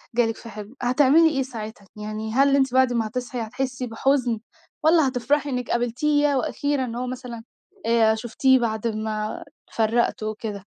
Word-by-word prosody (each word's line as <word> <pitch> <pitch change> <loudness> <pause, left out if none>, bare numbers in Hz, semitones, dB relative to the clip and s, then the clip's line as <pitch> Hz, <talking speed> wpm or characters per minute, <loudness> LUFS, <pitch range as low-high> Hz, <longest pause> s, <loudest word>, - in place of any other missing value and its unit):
جَه 240 -1 +4
لِك 225 0 -3
في 230 - -10
حِلم، 210 +3 -9
هتعملي 285 +6 +5
إيه 270 - +2
ساعتها؟ 220 -5 -8
يعني 215 +1 -5
هل 275 +2 +4
أنتِ 265 -2 +2
بعد 260 -1 +4
ما 225 -2 0
هتصحِي 245 +1 -4
هتحسّي 250 +2 -3
بحُزن 245 0 +1 0.4
والّا 315 -3 +5
هتفرَحي 275 +3 0
إنِك 250 -2 -3
قابلتيه، 260 +5 +1
ياه 280 -2 +1
وأخيرًا! 265 0 -1
هو 250 0 -3
مثلًا 245 -2 -7 0.4
آآ 225 -1 +4
شُفتيه 255 +3 +2
بعد 225 -1 -1
ما 215 -1 -3 0.3
اتفرّقتوا 220 -1 0
وكده؟ 210 -2 -6
245 Hz, 160 wpm, -24 LUFS, 220-265 Hz, 0.4 s, هتعملي